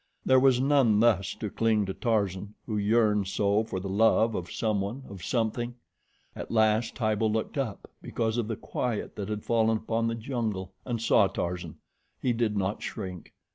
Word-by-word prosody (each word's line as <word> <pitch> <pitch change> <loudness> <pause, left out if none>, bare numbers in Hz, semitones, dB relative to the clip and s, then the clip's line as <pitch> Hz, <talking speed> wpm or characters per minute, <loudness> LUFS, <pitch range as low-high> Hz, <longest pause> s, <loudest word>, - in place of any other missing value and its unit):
There 130 0 +6
was 130 -1 +4
none 130 -6 +4
thus 105 -5 +2
to 105 - -5
cling 110 -2 +2
to 95 - -3
Tarzan, 100 -3 -1
who 110 - -3
yearned 105 -1 +2
so 100 +2 +1
for 95 -4 -4
the 95 - -5
love 110 +3 +3
of 90 -2 -4
someone, 110 +3 -1
of 95 -4 -10
something. 120 0 -1 0.6
At - - -7
last 110 +1 +2
Tibo 110 -2 +1
looked 110 0 -2
up, 130 -8 -3
because 115 0 -2
of 115 - -1
the 115 - -2
quiet 120 +1 -3
that 100 0 -5
had 105 -1 -3
fallen 110 -1 +2
upon 115 +1 -1
the 115 - -1
jungle, 110 -6 -3
and 120 -2 -2
saw 110 -3 +4
Tarzan. 90 -3 -4 0.4
He 125 - +1
did 115 -3 0
not 100 +1 -1
shrink. 90 -5 -6
110 Hz, 175 wpm, -28 LUFS, 100-115 Hz, 0.6 s, There